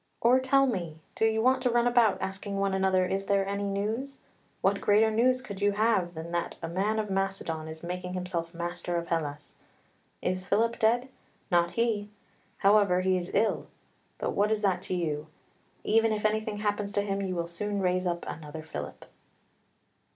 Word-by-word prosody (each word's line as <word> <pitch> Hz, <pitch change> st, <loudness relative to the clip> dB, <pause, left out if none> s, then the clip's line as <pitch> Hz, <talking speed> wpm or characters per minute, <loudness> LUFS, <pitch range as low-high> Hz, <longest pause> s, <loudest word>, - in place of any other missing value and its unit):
"Or 245 Hz, +3 st, +5 dB
tell 275 Hz, +1 st, +4 dB
me, 175 Hz, -10 st, -2 dB, 0.2 s
do 225 Hz, -, +1 dB
you 220 Hz, 0 st, +1 dB
want 260 Hz, +1 st, +3 dB
to 250 Hz, -, +2 dB
run 240 Hz, 0 st, +2 dB
about 240 Hz, -4 st, +4 dB
asking 195 Hz, +1 st, -4 dB
one 195 Hz, 0 st, +1 dB
another, 190 Hz, -1 st, +2 dB
is 195 Hz, +1 st, -2 dB
there 200 Hz, -1 st, +2 dB
any 200 Hz, +1 st, -2 dB
news? 220 Hz, +8 st, -2 dB, 0.4 s
what -, -, +2 dB
greater 215 Hz, +2 st, +4 dB
news 255 Hz, +3 st, +2 dB
could 200 Hz, -4 st, -8 dB
you 205 Hz, 0 st, +3 dB
have 200 Hz, -5 st, +1 dB
than 160 Hz, +1 st, -6 dB
that 170 Hz, 0 st, -2 dB
a -, -, -4 dB
man 195 Hz, +6 st, 0 dB
of 210 Hz, -2 st, -2 dB
Macedon 190 Hz, -5 st, -2 dB
is 160 Hz, +1 st, -9 dB
making 180 Hz, +1 st, -4 dB
himself 180 Hz, -2 st, -3 dB
master 175 Hz, 0 st, -4 dB
of 170 Hz, 0 st, -2 dB
Hellas? 150 Hz, -3 st, -3 dB, 0.7 s
Is 185 Hz, 0 st, -1 dB
Philip 230 Hz, +5 st, +1 dB
dead? 240 Hz, +4 st, +2 dB, 0.4 s
Not 175 Hz, -1 st, +4 dB
he. 220 Hz, -3 st, +1 dB, 0.5 s
However, 200 Hz, -2 st, +4 dB
he 185 Hz, 0 st, +2 dB
is 180 Hz, 0 st, -3 dB
ill. 225 Hz, -, +1 dB, 0.5 s
But -, -, -2 dB
what 205 Hz, +2 st, +1 dB
is 215 Hz, -1 st, 0 dB
that 185 Hz, -3 st, +2 dB
to 185 Hz, -, 0 dB
you? 155 Hz, -3 st, -2 dB, 0.6 s
Even 225 Hz, +1 st, +3 dB
if 215 Hz, 0 st, -1 dB
anything 215 Hz, 0 st, 0 dB
happens 205 Hz, -1 st, -1 dB
to 205 Hz, -, +1 dB
him 200 Hz, -1 st, -2 dB
you 185 Hz, -2 st, -2 dB
will 170 Hz, -1 st, -1 dB
soon 200 Hz, +4 st, -3 dB
raise 185 Hz, -1 st, +1 dB
up 175 Hz, -1 st, -2 dB
another 155 Hz, 0 st, -7 dB
Philip." 160 Hz, -, -7 dB
195 Hz, 185 wpm, -29 LUFS, 175-220 Hz, 0.7 s, Or